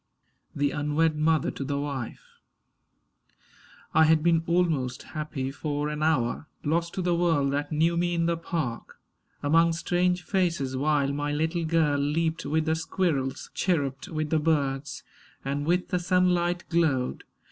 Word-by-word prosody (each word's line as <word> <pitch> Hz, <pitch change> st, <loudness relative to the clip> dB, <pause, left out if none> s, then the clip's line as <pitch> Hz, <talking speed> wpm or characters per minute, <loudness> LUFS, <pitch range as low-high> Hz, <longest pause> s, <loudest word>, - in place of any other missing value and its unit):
THE 145 Hz, 0 st, +1 dB
UNWED 150 Hz, +2 st, +1 dB
MOTHER 155 Hz, -1 st, +2 dB
TO -, -, -5 dB
THE 140 Hz, +1 st, -2 dB
WIFE 140 Hz, -5 st, -5 dB, 1.7 s
I 160 Hz, -, +6 dB
HAD 155 Hz, -1 st, +4 dB
been 165 Hz, -1 st, +3 dB
almost 165 Hz, -8 st, 0 dB
happy 150 Hz, -4 st, -4 dB
for 145 Hz, +1 st, -2 dB
an 150 Hz, 0 st, -4 dB
hour, 155 Hz, -2 st, +1 dB, 0.2 s
Lost 170 Hz, +3 st, 0 dB
to 185 Hz, -, -2 dB
the 175 Hz, 0 st, +2 dB
world 165 Hz, -5 st, +2 dB
that 145 Hz, +1 st, -2 dB
knew 160 Hz, +3 st, +2 dB
me 175 Hz, 0 st, 0 dB
in 165 Hz, 0 st, +1 dB
the 170 Hz, 0 st, +1 dB
park 165 Hz, -8 st, -4 dB, 0.4 s
Among 165 Hz, +3 st, +4 dB
strange 180 Hz, +2 st, 0 dB
faces; 170 Hz, -8 st, 0 dB
while 140 Hz, 0 st, +1 dB
my 145 Hz, +1 st, -2 dB
little 160 Hz, +3 st, -1 dB
girl 155 Hz, -3 st, +2 dB
Leaped 160 Hz, +2 st, -1 dB
with 155 Hz, +2 st, +1 dB
the 160 Hz, -, +2 dB
squirrels, 160 Hz, -5 st, -2 dB
chirruped 145 Hz, -7 st, -1 dB
with 155 Hz, -4 st, -3 dB
the 160 Hz, -, +3 dB
birds 140 Hz, -3 st, -1 dB, 0.4 s
And 140 Hz, +2 st, -2 dB
with 180 Hz, +2 st, +1 dB
the 180 Hz, -, 0 dB
sunlight 175 Hz, -1 st, +1 dB
glowed. 155 Hz, -7 st, +1 dB
155 Hz, 150 wpm, -27 LUFS, 145-170 Hz, 1.7 s, I